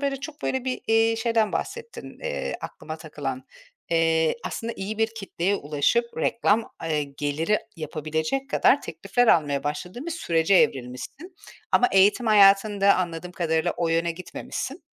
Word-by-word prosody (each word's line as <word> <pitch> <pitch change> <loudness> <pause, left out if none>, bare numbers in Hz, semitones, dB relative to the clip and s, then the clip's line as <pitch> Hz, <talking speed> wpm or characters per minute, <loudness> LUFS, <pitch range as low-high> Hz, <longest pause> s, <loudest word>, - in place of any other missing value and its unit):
böyle, 280 -1 -1
çok, 300 +1 -8
böyle, 260 -1 -1
bir, 255 -1 -2
iii, 225 0 +3
şeyden 225 -2 +1
bahsettin, 465 -1 -6
eee, - - -3
aklıma - - -7
takılan. - - -6 0.5
Eee, 165 0 +2
aslında 230 +1 -4
iyi 210 +3 -5
bir 225 0 +2
kitleye 195 -2 -1
ulaşıp, 150 +10 +1
reklam, 220 +5 +1
ııı, 155 -2 0 0.2
geliri 150 +8 0 0.2
yapabilecek 160 - -3
kadar - - +4
teklifler 245 0 0
almaya 145 -8 +3
başladığın 180 - -4
bir 340 - -3
sürece 170 - +1
evrilmişsin 135 - 0 0.4
ama 245 - +5
eğitim 200 +5 +4
hayatında 200 -1 +5
anladığım 175 0 -3
kadarıyla 165 0 0
o 170 - 0
yöne 165 +1 +1
gitmemişsin. 180 +2 -6
195 Hz, 140 wpm, -25 LUFS, 160-230 Hz, 0.5 s, ama